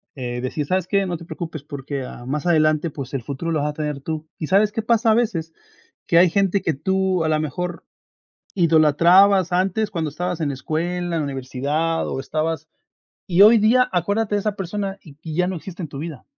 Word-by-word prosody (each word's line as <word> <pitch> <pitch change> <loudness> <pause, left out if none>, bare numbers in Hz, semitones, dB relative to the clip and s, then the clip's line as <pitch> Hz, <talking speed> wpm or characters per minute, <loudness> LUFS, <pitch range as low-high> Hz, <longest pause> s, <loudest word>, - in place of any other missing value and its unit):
eh, 120 -2 -4
decir: 135 +4 -3
"¿Sabes 185 +3 -1
qué?, 200 -1 +1
no 180 -2 -2
te 170 - -9
preocupes 160 -3 -7
porque, 140 -1 -5
ah, 120 -1 -9
más 145 +5 -3
adelante, 155 -1 +3
pues, 140 -3 -8
el 135 - -2
futuro 145 +6 -4
lo 155 - +1
vas 150 - 0
a - - -4
tener 150 -2 -4
tú", 155 +2 -5
¿y 155 - -4
sabes 205 +2 +3
qué 225 - -1
pasa 225 0 +2
a - - +5
veces?, 175 -9 -1 0.5
que 170 - +3
hay 175 +1 +6
gente 195 +1 +1
que 165 - 0
tú, 190 +3 0
a 160 - 0
la 155 -1 +2
mejor, 170 +3 -4 0.7
idolatrabas 175 +3 +5
antes 195 +4 0
cuando 165 -5 -2
estabas 180 +2 -3
en 150 -3 -1
escuela, 160 +6 -2 0.2
en - - 0
la - - 0
universidad 140 +4 -2
o - - -3
estabas 155 +1 -3 0.6
y 180 +1 +3
hoy 220 +3 +9
día 245 +4 +4
acuérdate 205 +4 0
de - - +2
esa 205 0 -2
persona 195 +1 -4
y-y 155 +1 -9
ya 180 0 +2
no 190 - -3
existe 180 +1 -8
en 155 - -6
tu 140 -1 -8
vida. 160 -3 -7
165 Hz, 215 wpm, -22 LUFS, 150-190 Hz, 0.7 s, hoy